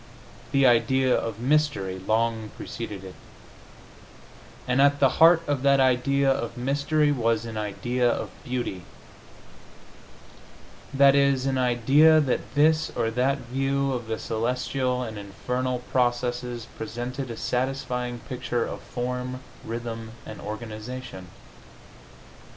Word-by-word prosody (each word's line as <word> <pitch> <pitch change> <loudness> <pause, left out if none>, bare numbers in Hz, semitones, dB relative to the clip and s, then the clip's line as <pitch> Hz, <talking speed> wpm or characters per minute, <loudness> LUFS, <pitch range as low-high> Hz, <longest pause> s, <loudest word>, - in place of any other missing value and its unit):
The 140 -1 +4
idea 130 +1 +4
of 115 -1 -3
mystery 125 -9 +1
long 110 +2 0
preceded 105 -5 -6
it, 95 -1 -9 1.5
and 125 +2 +3
at 140 0 +4
the 135 +2 +2
heart 165 0 +7
of 145 -3 -1
that 140 0 +4
idea 135 +2 +2
of 120 -3 -3
mystery 145 +4 +1
was 115 -4 0
an 115 -1 -6
idea 120 +4 0
of - - -2
beauty 125 -8 -3 2.1
that 140 0 +6
is, 140 -2 +3
an 135 -1 0
idea 135 +6 +5
that 140 -2 -1
this 155 +2 +3
or 115 -2 0
that 130 +4 +1
view 135 0 0
of 120 -3 -4
the 110 0 -2
celestial 125 +3 -1
and 110 -3 -6
infernal 125 +6 -3
process 120 -1 +1 0.3
presented 120 +4 -5
a 115 - -6
satisfying 125 -1 -2
picture 120 -2 -2
of - - -6
form, 125 +1 -4 0.2
rhythm 115 -1 -6
and 110 - -9
organization. 110 -1 -7
125 Hz, 120 wpm, -25 LUFS, 115-135 Hz, 2.1 s, heart